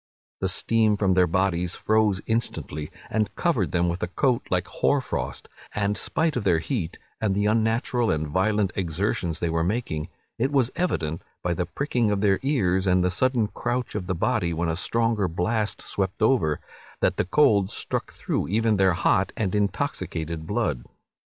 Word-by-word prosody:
The 95 - 0
steam 110 +2 +2
from 95 -2 +2
their 90 -1 +4
bodies 90 0 0
froze 110 -3 +2
instantly, 95 -9 -2 0.2
and 110 -1 +1
covered - - +1
them 85 0 +2
with 85 +1 -2
a - - 0
coat 125 +6 +1
like 90 -1 +1
hoar 115 +10 +1
frost; 130 - -4 0.3
and 105 0 +1
spite 160 +6 0
of 120 - -1
their 90 -4 +3
heat, 85 - -3 0.2
and 100 -3 +1
the 105 +1 +1
unnatural 115 +2 +1
and 80 0 0
violent 95 +4 +1
exertions 85 -1 -1
they 85 - -1
were 80 0 +1
making, 90 -6 -2 0.3
it 135 +4 +1
was 130 -4 +2
evident, 85 - -1 0.2
by 90 - +1
the 85 0 -2
pricking 125 0 0
of 100 -1 0
their 100 -2 +3
ears, 95 -9 +1
and 90 0 +4
the 90 - +2
sudden 125 +3 +2
crouch 125 +2 -2
of 95 -4 -4
the 95 - 0
body 85 0 0
when 85 +1 0
a 80 - 0
stronger 115 +2 +1
blast 105 +6 -1
swept 95 +2 -2
over, 105 - +3 0.4
that - - +2
the - - +1
cold 100 -3 +4
struck - - -3
through - - -2
even 110 +2 +2
their 95 -2 +4
hot - - +2
and 100 -5 -1
intoxicated 85 -5 -2
blood. - - -1
100 Hz, 175 wpm, -25 LUFS, 90-110 Hz, 0.4 s, their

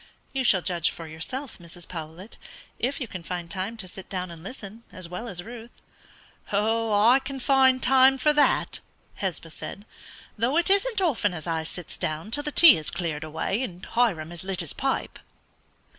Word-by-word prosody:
"You 270 -1 0
shall 190 -7 +4
judge 175 -2 +1
for 165 - -8
yourself, 210 - -6
Mrs. 170 0 -7
Powlett, 165 +4 -8 0.4
if 260 +4 -1
you 255 - -3
can 185 -4 -7
find 170 0 -5
time 200 +4 -3
to 200 -4 -5
sit 185 +1 -10
down 185 -2 -4
and 165 -1 -10
listen, 210 0 -9
as 185 -4 -7
well 180 +7 -6
as 175 -5 -6
Ruth." 235 +1 -9 0.8
"I 220 +3 +4
can 270 0 -5
find 260 -1 +4
time 265 +1 +6
for 300 +3 +3
that," 295 - +3 0.4
Hesba 175 -4 -3
said, 200 +5 -8 0.5
"though 250 +7 +2
it 345 +3 +3
isn't 400 +1 +3
often 230 - +1
as 160 - -7
I 165 -2 -1
sits 170 +1 -7
down 155 +7 -3
till 290 - +2
the 300 - -3
tea 330 0 +9
is 155 - -3
cleared 165 -3 -3
away 160 +8 -2
and 185 -8 -5
Hiram 190 -10 +1
has 175 0 -7
lit 190 -1 -1
his 165 - -6
pipe." 270 0 -2
200 Hz, 185 wpm, -26 LUFS, 170-255 Hz, 0.8 s, tea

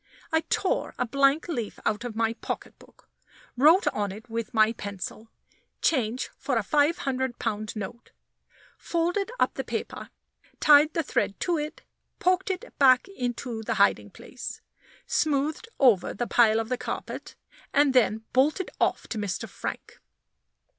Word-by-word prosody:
I 320 0 +3
tore 455 +6 0
a - - 0
blank 275 +5 +2
leaf 240 -11 -4
out 215 +2 0
of 240 -3 -5
my 225 0 +1
pocketbook, - - -8 0.5
wrote 310 +9 +6
on 205 -2 -2
it 215 +5 -10
with 230 -1 -3
my 220 0 +4
pencil, 205 +1 -7 0.5
"Change 250 -4 0
for 260 -4 0
a 225 - +1
five 295 +7 +2
hundred 260 -2 -2
pound 215 -1 -3
note," 220 +3 -7 0.7
folded 355 +5 -1
up - - +2
the - - -4
paper, - - -5 0.5
tied 300 +1 +6
the 330 - +1
thread 200 - -1
to 345 -3 +1
it, 300 +1 -6 0.3
poked 370 +2 +1
it 380 +6 -4
back 260 +2 +6
into 245 - -4
the 220 - -2
hiding - - +3
place, - - -8 0.5
smoothed 305 +8 0
over 235 -9 +4
the 240 - -2
pile 225 -2 +4
of 225 0 -3
the 250 - -1
carpet, - - -6 0.4
and 285 -1 +4
then 225 -3 +3
bolted 300 +8 +2
off - - +1
to 220 - -3
Mr. 200 -4 -3
Frank. - - -7
255 Hz, 150 wpm, -27 LUFS, 225-310 Hz, 0.7 s, wrote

